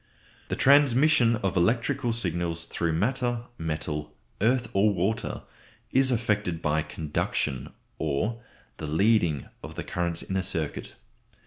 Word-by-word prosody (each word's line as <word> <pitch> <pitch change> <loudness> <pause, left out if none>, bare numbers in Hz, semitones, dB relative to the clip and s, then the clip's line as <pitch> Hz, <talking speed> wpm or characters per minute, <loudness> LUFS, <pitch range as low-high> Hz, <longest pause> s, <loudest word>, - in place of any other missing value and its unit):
_] - - -30
The - - -2
transmission 140 -2 +5
of 95 - 0
electrical 120 +7 +1
signals 85 -6 -1
through 85 -1 -1
matter, 120 +6 0 0.2
metal, 75 -2 -3 0.3
earth, 120 +2 +2
or 100 +2 +4
water, 100 +3 -1 0.5
is 130 0 +4
effected 105 -8 0
by 80 -1 +1
conduction, 75 -4 -2 0.3
or 95 +10 -1 0.4
the 75 - -5
leading 85 - +2
of - - -9
the - - -4
currents 85 -1 -2
in 95 - -4
a - - +2
circuit. 85 -5 -3
95 Hz, 130 wpm, -27 LUFS, 80-120 Hz, 0.5 s, transmission